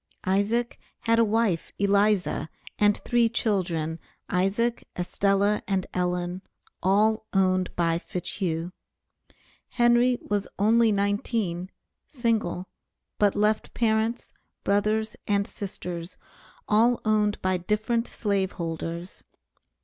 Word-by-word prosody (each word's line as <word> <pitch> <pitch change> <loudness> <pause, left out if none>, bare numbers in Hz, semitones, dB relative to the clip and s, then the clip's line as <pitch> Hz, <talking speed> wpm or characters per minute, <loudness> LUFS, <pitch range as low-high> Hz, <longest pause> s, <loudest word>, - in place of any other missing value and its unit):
Isaac 205 +6 0 0.2
had 230 0 +2
a - - +6
wife, 215 -5 +1
Eliza, 200 -4 +2 0.3
and 205 0 +4
three 240 -1 +3
children, 175 -8 -1 0.3
Isaac, 200 +6 +1
Estella, 200 +3 +1
and 190 -2 0
Ellen, 180 0 -1 0.4
all 215 +4 +2
owned 185 -1 +2
by 165 -1 +1
Fitchhugh. 175 -1 -3 1.0
Henry 240 +1 +3
was 205 -1 -2
only 225 +2 +4
nineteen, 200 -3 -1 0.4
single, 225 - -1 0.5
but 205 -2 +3
left 210 +1 +1
parents, 225 +1 0 0.3
brothers, 215 +2 +1
and 200 -1 +2
sisters, 180 -5 -6 0.5
all 230 +3 +4
owned 210 -1 +2
by 185 0 +2
different 215 +6 0
slave 200 -3 -1
holders. 170 +1 -5
205 Hz, 100 wpm, -26 LUFS, 180-220 Hz, 1.0 s, a